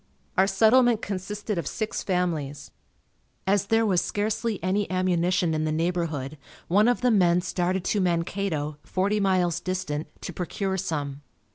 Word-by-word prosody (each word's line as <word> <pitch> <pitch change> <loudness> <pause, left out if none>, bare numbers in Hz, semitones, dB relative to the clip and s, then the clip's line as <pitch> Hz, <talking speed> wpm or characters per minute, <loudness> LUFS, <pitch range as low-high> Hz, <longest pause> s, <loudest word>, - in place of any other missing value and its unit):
Our 190 +1 +4
settlement 225 +3 +4
consisted 200 +1 -3
of 165 - -4
six 215 -1 -3
families. 165 -7 -2 0.7
As 200 +1 +2
there 225 +1 +3
was 185 -5 +3
scarcely 215 +3 -1
any 195 +2 0
ammunition 180 -2 +1
in 155 0 0
the 155 - 0
neighborhood 155 -4 -2 0.3
one 205 +5 +4
of 245 0 +2
the 250 -1 +3
men 180 -4 +4
started 180 +1 -1
to 205 - +1
Mankato, 170 -4 -1
forty 200 +6 0
miles 180 -4 +2
distant, 180 -5 -3 0.2
to 180 - -5
procure 190 +2 -2
some. 145 -6 -3
185 Hz, 145 wpm, -26 LUFS, 170-205 Hz, 0.7 s, Our